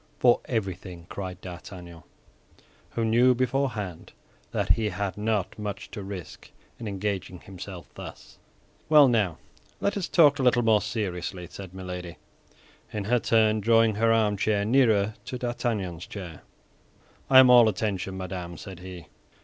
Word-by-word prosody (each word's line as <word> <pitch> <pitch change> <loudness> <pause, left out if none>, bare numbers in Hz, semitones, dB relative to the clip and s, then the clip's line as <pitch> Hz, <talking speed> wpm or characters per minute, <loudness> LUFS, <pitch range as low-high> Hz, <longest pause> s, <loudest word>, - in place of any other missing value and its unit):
"For 120 -1 +4
everything," 95 -6 -4
cried 95 -2 -6
D'Artagnan, 90 -2 -10 0.9
who 115 - 0
knew 120 +3 +4
beforehand 120 -8 -2 0.4
that - - -2
he 110 -2 +3
had 100 0 -3
not 105 -1 -2
much 105 -2 -5
to 105 - -6
risk 95 -3 -8 0.3
in 115 - -6
engaging 95 -3 -3
himself 95 -1 -9
thus. - - -11 0.5
"Well, 150 -3 +8
now 105 -9 +1 0.4
let 200 - 0
us 195 -4 -2
talk 145 -5 +5
a - - +1
little 120 -4 +4
seriously," 95 -5 -4
said 95 -2 -9
Milady, 90 -2 -7 0.7
in 105 - -3
her 120 +4 +2
turn 110 -1 +3
drawing 115 +1 +4
her 115 +2 +2
armchair 105 -2 +2
nearer 110 -4 +3
to 125 - -5
D'Artagnan's 115 -8 -3
chair. 90 -6 -8 0.9
"I 130 - +7
am 130 -1 +9
all 120 -3 +8
attention, 95 -2 -3
madame," 90 -2 -6
said 95 -4 -9
he. 90 -2 -9
105 Hz, 140 wpm, -26 LUFS, 95-115 Hz, 0.9 s, am